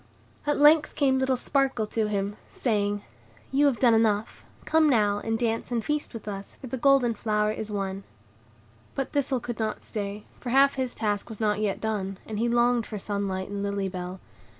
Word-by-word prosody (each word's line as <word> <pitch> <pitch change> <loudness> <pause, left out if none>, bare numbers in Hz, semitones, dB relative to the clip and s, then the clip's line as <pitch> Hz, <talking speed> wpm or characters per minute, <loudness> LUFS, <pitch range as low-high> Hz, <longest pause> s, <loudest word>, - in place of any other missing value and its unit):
At 295 - +2
length 300 +1 +5
came 265 -2 +3
little 265 -1 +1
Sparkle 265 -4 +1
to 215 0 -1
him, 205 0 -2
saying, 205 -3 -1 0.5
"You 285 +2 +4
have 265 -4 +1
done 240 -3 +5
enough; 220 -1 +1 0.2
come 320 -1 +4
now, 205 -5 +3
and 225 +1 -1
dance 230 0 -1
and 230 -2 -1
feast 300 -4 -2
with 220 - -8
us, 200 -1 -6
for - - -11
the 255 - -4
golden 260 -2 +4
flower 210 -1 0
is 220 0 -5
won." 195 -1 -3 0.9
But 270 - -2
Thistle 275 -3 0
could 240 -1 -6
not 215 -1 -2
stay, 205 0 -5 0.2
for 250 - -5
half 275 +2 +5
his 260 -2 -3
task 205 -1 -1
was 220 - -8
not 210 -2 +1
yet 210 -2 0
done; 195 -3 -2
and 215 -1 -4
he 235 +1 +1
longed 240 -1 +2
for 215 - -5
sunlight 200 -2 -3
and 200 0 -4
Lily 200 -1 -1
Bell. 180 0 -6
220 Hz, 195 wpm, -27 LUFS, 205-255 Hz, 0.9 s, length